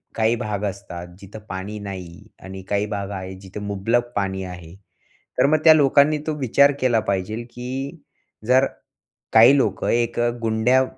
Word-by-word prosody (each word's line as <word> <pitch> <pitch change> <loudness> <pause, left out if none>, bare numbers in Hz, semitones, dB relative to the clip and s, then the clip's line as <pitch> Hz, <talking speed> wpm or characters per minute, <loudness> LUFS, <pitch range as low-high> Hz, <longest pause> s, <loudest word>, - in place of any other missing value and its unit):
काही 110 +1 +2
भाग 105 -3 -4
असतात 95 -3 -6
जिथं 100 +2 -11
पाणी 95 +3 -5
नाही 95 -4 -8 0.2
आणि 95 +1 -8
काही 100 0 +1
भाग 100 -2 -4
आहे 95 -1 -6
जिथं 95 +1 -9
मुबलक 115 +4 -1
पाणी 95 -1 -2
आहे. 90 -2 -9 0.6
तर - - +5
मग 155 +2 +4
त्या 160 - +9
लोकांनी 145 0 +4
तो 155 - 0
विचार 140 +2 +4
केला 120 -3 +3
पाहिजेल 100 +4 -2
की 130 +6 -5 0.5
जर 130 +2 +5 0.7
काही 115 +5 +7
लोकं 135 - 0
एक 120 0 0 0.2
गुंड्या 115 +4 +3
105 Hz, 155 wpm, -22 LUFS, 95-125 Hz, 0.7 s, त्या